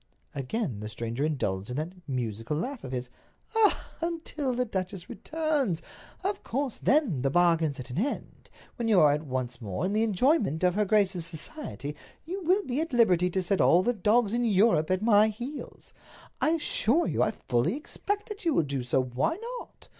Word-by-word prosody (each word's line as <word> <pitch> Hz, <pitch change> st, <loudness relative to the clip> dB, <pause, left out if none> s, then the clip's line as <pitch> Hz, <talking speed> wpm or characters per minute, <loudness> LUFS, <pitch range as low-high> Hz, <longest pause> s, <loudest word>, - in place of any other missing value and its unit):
Again 135 Hz, -, -3 dB
the 105 Hz, 0 st, -5 dB
stranger 115 Hz, +4 st, -3 dB
indulged 105 Hz, -10 st, -1 dB
in 125 Hz, -, -3 dB
that 160 Hz, +4 st, -3 dB
musical 120 Hz, 0 st, -2 dB
laugh 255 Hz, -, -4 dB
of 130 Hz, -, -6 dB
his. 125 Hz, -1 st, -4 dB, 0.4 s
"Ah, 440 Hz, -2 st, +3 dB
until 325 Hz, -4 st, -2 dB
the 250 Hz, 0 st, 0 dB
duchess 190 Hz, -4 st, -4 dB
returns! 300 Hz, -, -1 dB, 0.4 s
Of 395 Hz, +1 st, -1 dB
course, 265 Hz, 0 st, -3 dB
then 260 Hz, -, +2 dB
the 135 Hz, -, +1 dB
bargain's 165 Hz, -3 st, +2 dB
at 125 Hz, -, -7 dB
an 125 Hz, -, -2 dB
end. 275 Hz, +7 st, -4 dB, 0.3 s
When 235 Hz, -2 st, -1 dB
you 210 Hz, -4 st, +5 dB
are 145 Hz, -2 st, +6 dB
once 130 Hz, -4 st, -4 dB
more 105 Hz, -, -3 dB
in 195 Hz, -, -1 dB
the 215 Hz, -, +2 dB
enjoyment 215 Hz, -, +2 dB
of 180 Hz, -1 st, +4 dB
her 210 Hz, +2 st, +1 dB
grace's 195 Hz, -5 st, +2 dB
society, 160 Hz, -, -4 dB, 0.3 s
you 375 Hz, +4 st, -4 dB
will 370 Hz, +4 st, +2 dB
be 260 Hz, +4 st, -1 dB
at 325 Hz, -4 st, -4 dB
liberty 180 Hz, -7 st, +4 dB
to 185 Hz, +1 st, -1 dB
set 190 Hz, +2 st, +1 dB
all 175 Hz, +2 st, +5 dB
the 245 Hz, -, +2 dB
dogs 215 Hz, +1 st, +2 dB
in 240 Hz, +1 st, +1 dB
Europe 200 Hz, -7 st, +3 dB
at 185 Hz, +2 st, +1 dB
my 215 Hz, -1 st, +6 dB
heels. 240 Hz, +7 st, -7 dB, 0.5 s
I -, -, +4 dB
assure 320 Hz, -1 st, +1 dB
you -, -, 0 dB
I -, -, +4 dB
fully 125 Hz, -, 0 dB
expect 410 Hz, +7 st, -4 dB
that 420 Hz, 0 st, -7 dB
you 330 Hz, -4 st, +2 dB
will 170 Hz, -, +4 dB
do 140 Hz, -2 st, -3 dB
so—why 130 Hz, -, 0 dB, 0.2 s
not?" -, -, -14 dB
195 Hz, 185 wpm, -28 LUFS, -, 0.5 s, are